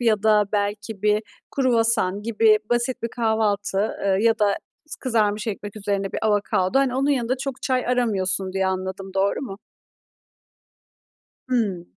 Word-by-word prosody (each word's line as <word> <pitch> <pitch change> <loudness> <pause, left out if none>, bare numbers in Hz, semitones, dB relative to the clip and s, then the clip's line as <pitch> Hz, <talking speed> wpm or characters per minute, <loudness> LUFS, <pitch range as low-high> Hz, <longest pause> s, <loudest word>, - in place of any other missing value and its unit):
ya 220 -4 +2
da 210 -1 +4
belki 205 0 -2
bir 210 +1 +3 0.3
kruvasan 225 -6 +2
gibi 220 -1 +4
basit 240 +2 0
bir 230 - -1
kahvaltı, 220 -4 0 0.3
ııı, 190 -1 +2
ya 225 0 +3
da 205 -1 +2 0.3
s 310 - -8
kızarmış 215 -3 0
ekmek 205 0 -5
üzerine 200 -1 -2
bir - - -2
avokado. 205 +1 +1
Hani, 270 -2 +1
onun 275 +2 +1
yanında 255 -2 +1
çok 270 0 -5
çay 255 -2 0
aramıyorsun 195 -6 0
diye 190 0 0
anladım, 190 +1 -4
doğru 195 +1 +1
mu? 200 -8 -6 1.9
Hımm. 205 -9 0
215 Hz, 145 wpm, -23 LUFS, 195-235 Hz, 1.9 s, da